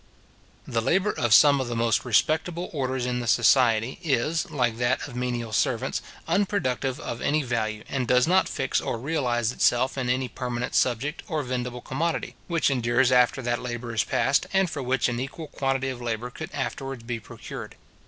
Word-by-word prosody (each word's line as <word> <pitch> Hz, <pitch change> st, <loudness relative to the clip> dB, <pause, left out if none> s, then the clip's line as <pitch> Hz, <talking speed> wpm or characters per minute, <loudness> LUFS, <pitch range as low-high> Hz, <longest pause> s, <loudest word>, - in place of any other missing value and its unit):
The 115 Hz, -1 st, 0 dB
labour 185 Hz, -, +2 dB
of 120 Hz, -2 st, -1 dB
some 140 Hz, +4 st, +7 dB
of 130 Hz, -, -3 dB
the 120 Hz, -, -3 dB
most 115 Hz, +1 st, +1 dB
respectable 160 Hz, +9 st, +1 dB
orders 130 Hz, -3 st, -1 dB
in 125 Hz, 0 st, -1 dB
the 120 Hz, -, -4 dB
society 115 Hz, 0 st, +3 dB
is, 155 Hz, 0 st, 0 dB
like 120 Hz, -5 st, 0 dB
that 120 Hz, +4 st, 0 dB
of 130 Hz, -, -10 dB
menial 120 Hz, -2 st, -3 dB
servants, -, -, 0 dB, 0.3 s
unproductive 140 Hz, -10 st, 0 dB
of 120 Hz, -, -5 dB
any 150 Hz, +1 st, +1 dB
value, 110 Hz, -4 st, -2 dB
and 130 Hz, -3 st, -2 dB
does 125 Hz, +1 st, +4 dB
not 185 Hz, +3 st, +3 dB
fix 135 Hz, -1 st, -1 dB
or -, -, -2 dB
realize 120 Hz, -4 st, 0 dB
itself 125 Hz, +2 st, +2 dB
in 125 Hz, -1 st, -1 dB
any 130 Hz, +1 st, +1 dB
permanent 125 Hz, 0 st, -4 dB
subject, 130 Hz, -, +1 dB
or 155 Hz, -4 st, -1 dB
vendible 125 Hz, -1 st, -3 dB
commodity, 165 Hz, +5 st, -2 dB
which 170 Hz, -4 st, +1 dB
endures 120 Hz, 0 st, +2 dB
after 125 Hz, +1 st, +3 dB
that 120 Hz, 0 st, -1 dB
labour 120 Hz, -1 st, -5 dB
is 110 Hz, -, +2 dB
past, 140 Hz, -, +1 dB
and 190 Hz, -3 st, +2 dB
for 145 Hz, -, -4 dB
which 130 Hz, -1 st, +1 dB
an 120 Hz, -1 st, -2 dB
equal 145 Hz, +4 st, -6 dB
quantity 135 Hz, -1 st, -1 dB
of 125 Hz, -2 st, -6 dB
labour 120 Hz, +1 st, -3 dB
could 160 Hz, +6 st, -7 dB
afterwards 135 Hz, -2 st, -4 dB
be 120 Hz, 0 st, -4 dB
procured. 105 Hz, -, -9 dB
125 Hz, 185 wpm, -26 LUFS, 120-140 Hz, 0.3 s, some